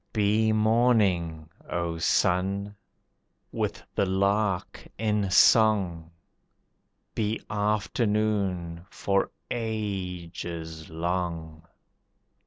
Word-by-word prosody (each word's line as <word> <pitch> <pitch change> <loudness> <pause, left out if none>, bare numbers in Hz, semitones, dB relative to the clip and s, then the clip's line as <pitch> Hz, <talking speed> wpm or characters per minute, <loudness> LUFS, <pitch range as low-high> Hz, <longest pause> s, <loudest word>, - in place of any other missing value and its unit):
Be 110 +1 +2
morning, 105 -8 +2 0.2
O 85 -1 -2
Sun! 95 +5 +1 0.8
with - - -3
the 100 - +1
lark 100 0 0
in 105 -2 0
song, 95 -6 +4 1.0
Be 110 0 -1
afternoon 105 -4 0
for 100 -1 0 0.2
ages 90 -7 -4
long. 85 -1 -3
95 Hz, 65 wpm, -27 LUFS, 85-105 Hz, 1.0 s, song